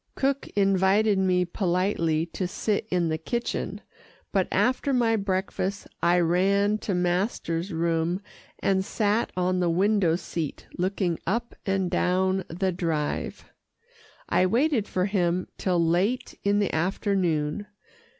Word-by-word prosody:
Cook 275 0 0
invited 195 +1 +3
me 180 -1 +2
politely 175 -3 0
to 185 - -2
sit 210 +3 -1
in 175 -2 +1
the 160 0 -1
kitchen, 235 +9 -3 0.5
but - - +1
after 260 +2 +1
my 235 -3 +3
breakfast 195 -1 -2
I 175 +1 +4
ran 200 +5 +2
to 195 - -2
master's 180 0 -1
room 165 +1 0 0.4
and 190 -1 +1
sat 210 +2 0
on 180 0 +1
the 175 -1 +2
window 190 -1 +3
seat 165 -3 -5
looking 180 -2 -1
up 235 +6 -1
and 195 -2 0
down 185 +1 +1
the 185 +3 -1
Drive. 165 -4 -2 0.8
I 185 - +3
waited 240 +1 +2
for 185 0 0
him 180 -3 0
till 180 -2 +1
late 180 +9 +1
in 200 0 +2
the 205 -2 0
afternoon. 175 -1 0
185 Hz, 130 wpm, -26 LUFS, 175-205 Hz, 0.8 s, I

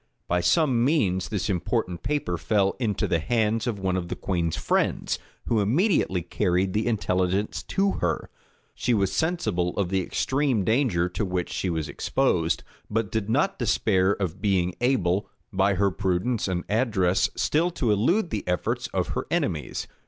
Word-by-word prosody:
By 90 0 +1
some 130 - +3
means 105 - +1
this 105 -4 -2
important 90 -1 -1
paper 145 -12 -1
fell 100 +3 +1
into 110 -6 0
the 85 - +1
hands 110 +4 0
of 115 -4 -1
one 95 -1 -1
of 90 -2 -2
the - - -4
queen's 85 -4 -1
friends, - - 0 0.3
who 115 - +1
immediately 110 - +2
carried 90 +2 0
the 110 +2 0
intelligence 95 -2 0
to 195 0 0
her. 85 -3 -1 0.4
She 120 - 0
was 100 -2 +1
sensible 105 - 0
of 100 -4 0
the 95 0 +1
extreme 130 +3 0
danger 110 -6 +2
to 100 - -3
which 90 -3 -2
she 95 - -2
was 80 -3 -2
exposed; 70 - 0 0.3
but 110 -2 -1
did 110 -2 -2
not 150 +12 +1
despair 100 -4 +2
of 95 -3 -4
being 95 -4 +1
able, 100 -7 +1 0.2
by 95 +1 +2
her 100 +1 +2
prudence 95 +5 0
and 90 -2 -1
address, 100 -5 +2
still 165 +4 +1
to 130 -10 0
elude 165 - +2
the 105 - -2
efforts 90 -1 -1
of - - -2
her - - -3
enemies. 75 -3 -1
100 Hz, 165 wpm, -25 LUFS, 90-120 Hz, 0.4 s, some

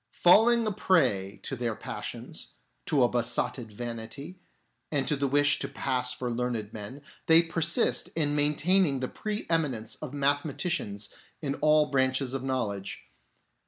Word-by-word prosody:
Falling 225 +6 +5
a 215 - 0
prey 125 - +1
to - - -4
their 120 -3 -2
passions, - - -7 0.3
to 140 -4 +3
a - - +5
besotted 120 -1 -1
vanity, 120 - -6 0.5
and 145 -3 0
the 140 -1 +1
wish 145 +2 +3
to - - -3
pass 125 -2 0
for 125 -1 -3
learned 115 -3 -3
men, 110 +7 -7 0.2
they 165 +1 +7
persist 165 0 +1
in 150 -3 0
maintaining 150 +1 +3
the 130 - -2
pre 215 - -4
eminence 140 -10 -1
of 155 -4 -5
mathe 145 0 +2
maticians 135 - -3 0.3
in 140 -2 -1
all 150 0 +4
branches 130 -1 +1
of 135 - -2
knowledge. 105 -7 -3
135 Hz, 145 wpm, -28 LUFS, 120-155 Hz, 0.5 s, they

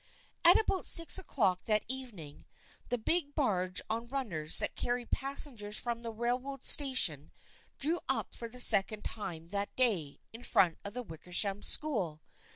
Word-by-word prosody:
At 345 +2 +8
about 390 -4 -1
six 335 +2 +5
o'clock 200 - -1
that 215 -1 +1
evening 230 - -8 0.4
the 245 - 0
big 290 +5 -2
barge 185 - +1
on 230 +2 -3
runners 210 - 0
that - - +2
carried 245 0 -3
passengers 260 -6 0
from 235 -1 -3
the 230 - -6
rail 240 +3 -1
road 275 0 -8
station 225 - +4 0.5
drew 325 +5 0
up - - -1
for 235 - -8
the 250 - -12
second 210 -2 +3
time 165 -6 -7
that 200 +1 -4
day 195 - 0
in 230 +2 -10
front 170 -4 +2
of 200 +2 -7
the 250 - -4
Wickersham 185 +3 -4
School. 200 - -1
230 Hz, 160 wpm, -32 LUFS, 190-265 Hz, 0.5 s, At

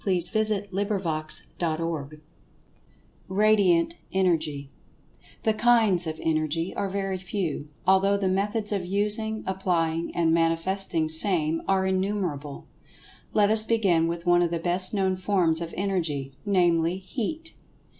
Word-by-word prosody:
[Pg 185 -3 +1
121] 195 -6 -2
CHAPTER 165 -1 -1
IX 145 0 -8 1.1
RADIANT 195 -4 +3 0.2
ENERGY 160 -7 0 0.7
THE 220 - +2
"kinds" 215 -6 +3
of 160 0 -4
Energy 160 +2 -1
are 200 - -2
very 195 -1 -3
few, 180 -6 -4 0.2
although 190 +2 +3
the 200 -1 -1
methods 205 +3 -1
of 200 -3 -1
using, 210 +3 -1
applying 170 -3 -1
and 165 -1 +2
manifesting 165 +1 +1
same 160 -1 +4
are 190 -1 +2
innumerable. 185 -7 -2 0.7
Let 210 -1 +3
us 220 0 +5
begin 195 -8 +2
with 170 +1 -4
one 175 0 +4
of 175 - +1
the 170 - -2
best 175 +2 +2
known 190 -2 0
forms 180 -4 +1
of 170 -1 -5
Energy, 165 -8 -2 0.2
namely, 175 -3 +2
Heat. 260 - -5
185 Hz, 125 wpm, -25 LUFS, 165-200 Hz, 1.1 s, us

